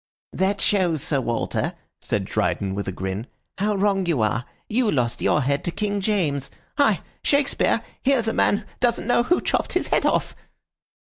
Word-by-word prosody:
"That 195 +1 0
shows, 175 -7 +2
Sir 140 -3 0
Walter," 120 -2 -1 0.3
said - - -1
Dryden, 95 -1 -1
with 100 +1 -3
a - - -1
grin, 95 +5 -4 0.3
"how 210 +1 +1
wrong 195 -2 +1
you 145 -10 +2
are. 115 +3 0 0.2
You 230 0 +1
lost 120 - 0
your 150 - +3
head 140 +2 0
to 175 - 0
King 205 +3 -1
James. 165 -10 0 0.3
Hi! 245 -9 +4 0.2
Shakespeare, 285 -1 +2 0.2
here's 260 -4 +2
a 225 - +1
man 205 +1 +2
doesn't 240 -2 +1
know 240 0 +3
who 350 +9 +2
chopped - - -1
his - - 0
head - - +3
off." - - +1
190 Hz, 175 wpm, -23 LUFS, 130-215 Hz, 0.3 s, Hi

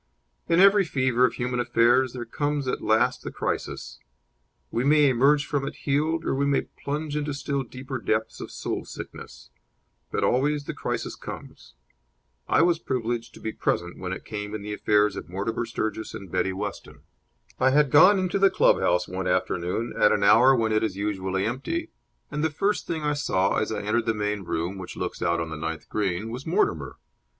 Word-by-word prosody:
In 170 +1 +4
every 200 +1 +7
fever 130 -6 +2
of 125 - 0
human 125 0 -2
affairs 120 +2 +3
there 120 -2 -5
comes 145 +3 -2
at - - -1
last 110 0 +2
the - - -5
crisis. - - -4 0.7
We 120 - 0
may 150 +1 +5
emerge 140 +3 +3
from 145 -1 -1
it - - -6
healed 155 +3 +1
or - - 0
we 140 +1 +1
may 140 - +2
plunge 150 +1 -5
into 150 -1 -2
still 140 0 -2
deeper 130 +1 -6
depths 110 -1 -1
of - - -6
soul - - -4
sickness; - - -10 0.6
but - - -1
always 145 +3 +1
the - - -5
crisis - - -3
comes. - - -10 0.7
I - - +4
was 170 -2 +3
privileged 120 -5 -3
to - - -12
be 110 - -4
present 85 -4 -2
when 90 -1 -4
it 95 - -6
came 105 -1 -5
in 105 - -6
the 105 0 -4
affairs 105 -1 +2
of - - -7
Mortimer 110 +5 -2
Sturgis 110 -1 -3
and 95 -4 -9
Betty 95 - 0
Weston. 100 +2 -6 0.6
I 130 - +4
had 145 0 +3
gone 185 +7 +7
into 185 +1 0
the 195 0 +6
club - - +4
house 90 0 +1
one 95 0 -4
afternoon 90 +7 -1
at 105 - +4
an 100 - +1
hour 125 +6 +6
when 115 -2 +1
it 110 0 +2
is 100 -4 -2
usually 95 -2 -1
empty, 230 - -3 0.4
and 150 +1 -2
the 160 - +2
first 195 +7 -1
thing 160 -2 -3
I 150 0 +1
saw, 95 -9 +1
as - - -1
I 105 -2 -3
entered 110 +3 0
the 115 - +1
main 105 -2 -2
room, 85 +4 -3
which 90 - -8
looks - - -4
out 85 0 +1
on 80 -1 -3
the - - -4
ninth 80 0 -5
green, 105 +1 -2
was 125 +3 -7
Mortimer. 410 -1 0
120 Hz, 195 wpm, -25 LUFS, 105-145 Hz, 0.7 s, every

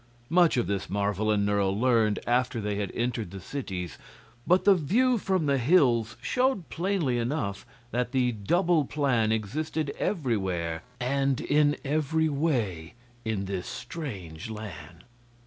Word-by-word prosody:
Much 175 -4 +5
of 120 - +2
this 100 -1 -2
Marvel 100 +1 0
and 105 -1 +2
Nerle 100 -1 +1
learned 115 -4 +3
after 125 0 +1
they 105 -1 -2
had 100 -2 -2
entered 115 -4 -1
the 95 +2 -8
cities, 95 - -5 0.5
but 180 +2 +4
the 200 - +8
view 225 - +2
from 185 -4 0
the 140 -2 +2
hills 120 -6 +3
showed 255 - +1
plainly 170 -9 0
enough 115 -5 -2 0.2
that 125 0 -1
the 125 -2 +2
"double" 165 - +2
plan 125 -7 +1
existed 140 +7 -2
everywhere 95 - -1 0.2
and 135 +1 +1
in 145 0 +2
every 155 +2 +1
way 120 - -1 0.3
in 110 -3 -2
this 95 -2 -4
strange 100 - -6
land. 90 -6 -8
120 Hz, 140 wpm, -28 LUFS, 100-155 Hz, 0.5 s, the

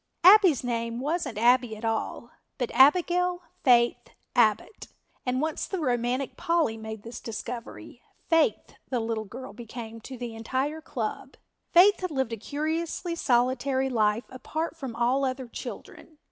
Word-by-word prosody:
Abbie's 370 - +7
name 230 -1 -2
wasn't 295 -4 -2
Abbie 240 0 +3
at 220 - -7
all, 225 +1 -3 0.3
but 245 - -2
Abigail 355 +5 +4 0.2
Faith 240 -3 +3 0.3
Abbott, 450 - +2 0.4
and 255 +1 +1
once 315 0 -2
the 385 - -3
romantic 250 -1 -1
Polly 335 -9 +1
made 220 -1 -7
this 230 +1 -8
discovery, 230 +1 -7 0.3
Faith 330 +6 +2 0.2
the 250 - 0
little 225 -1 -2
girl 240 +2 -9
became 230 0 -8
to 260 +3 -9
the 240 -1 -6
entire 260 +7 -2
club. 240 -8 -5 0.4
Faith 390 +4 +6
had 365 - -2
lived 265 -6 -1
a - - -3
curiously 315 - -3
solitary 260 -1 +1
life 220 0 +1
apart 315 +6 -4
from 265 -7 -6
all 245 +4 +1
other 260 -1 -2
children. 310 +6 -9
255 Hz, 145 wpm, -27 LUFS, 230-315 Hz, 0.4 s, Abbie's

